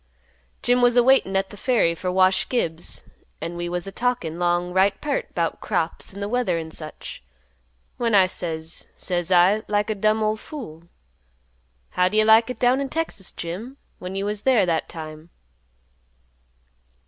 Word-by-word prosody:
Jim 245 +1 +3
was 245 0 +4
a 245 - +7
waitin' 255 -7 +4
at 195 0 0
th' 205 - -11
ferry 230 -9 +2
fer 180 +2 -4
Wash 185 0 +3
Gibbs, 170 -9 -3 0.4
an' 170 +2 -5
we 175 0 -3
was 175 0 -3
a 195 - -6
talkin' 210 -8 -2
'long 175 0 0
right 195 +1 +3
peart 290 -2 -3
'bout 165 -2 -1
crops 165 0 -2
an' 200 +1 -6
th' - - -2
weather 245 -9 +1
an' 160 -1 -5
such, 155 -1 -9 0.8
when 230 -3 +1
I 190 -2 +7
says, 165 -3 -4
says 175 -1 -2
I, 185 +4 +5
like 210 +1 0
a - - +1
dumb 215 +2 +2
ol' 215 0 +1
fool, 215 - -9 1.1
'How'd 180 +3 +1
you 215 0 +4
like 220 +2 +6
it 250 - -4
down 250 +3 +3
in 275 - -3
Texas, 320 - -3
Jim, 210 +11 -6 0.2
when 180 +1 -6
you 195 +1 -2
was 205 0 -3
there 250 -6 +4
that 165 -2 -1
time? 155 0 -9
195 Hz, 170 wpm, -23 LUFS, 175-230 Hz, 1.1 s, a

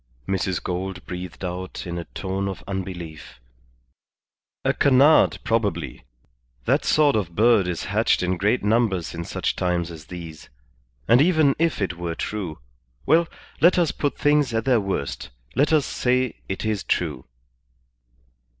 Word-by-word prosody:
Mrs. 95 -1 -1
Gould 90 0 -4
breathed 90 +1 -6
out 90 +1 -5
in 85 0 -4
a 85 - -6
tone 95 0 -3
of 95 - -6
unbelief. 90 -7 -6 1.3
"A - - +3
canard, 140 +3 +5
probably. 100 - -1 0.6
That - - +2
sort 150 -2 +4
of 90 -6 -2
bird 110 -4 +4
is 85 -2 -3
hatched - - +1
in 90 0 0
great 105 +6 +1
numbers 105 -5 +1
in 85 0 -4
such - - -2
times 85 -2 -1
as 80 -2 -10
these. 80 -4 -9 0.6
And 120 +3 +6
even 155 -4 +4
if 165 -10 +1
it 90 -3 -3
were 85 -1 -3
true? 95 -7 -4 0.5
Well, 165 +1 +4 0.3
let 175 +3 +5
us 170 -4 +3
put 145 - -2
things 145 -5 +2
at 115 - 0
their 125 -4 +3
worst, 95 -8 -3 0.2
let 145 +5 +2
us 155 -3 +3
say 125 0 0
it 95 +3 -3
is 110 -3 -1
true." 75 -7 -1
95 Hz, 150 wpm, -23 LUFS, 90-125 Hz, 1.3 s, And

